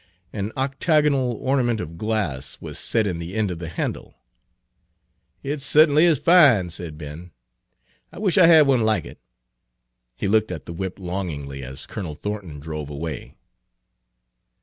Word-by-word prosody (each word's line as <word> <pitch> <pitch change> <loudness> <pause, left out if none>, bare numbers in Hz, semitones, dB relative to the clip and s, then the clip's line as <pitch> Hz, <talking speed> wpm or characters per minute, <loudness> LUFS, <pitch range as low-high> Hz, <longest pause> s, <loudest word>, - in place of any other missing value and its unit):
An 105 +1 -3
octagonal 140 -1 +1
ornament 120 -1 0
of 80 -2 -6
glass 85 - -2
was - - -7
set 110 -2 +1
in 90 -4 -2
the 85 +3 -6
end 110 -3 0
of 85 - -6
the 85 -2 -6
handle. - - -4 1.3
"It 145 +2 -3
cert'n'y 150 +1 +5
is 165 -4 +4
fine," 135 - +5
said 80 -3 -6
Ben; 75 +3 -9 0.8
"I - - -13
wish 195 -2 0
I 175 - +8
had 160 -3 +7
one 135 -3 +3
like 110 -1 +1
it." - - -12 1.0
He 100 - -3
looked 110 0 +2
at 85 - -6
the 85 - -7
whip 95 +2 -5
longingly 85 -8 -5
as 65 +2 -8
Colonel 90 -9 -6
Thornton 95 -6 -6
drove 75 -1 -6
away. 75 +2 -6
100 Hz, 150 wpm, -23 LUFS, 80-135 Hz, 1.3 s, I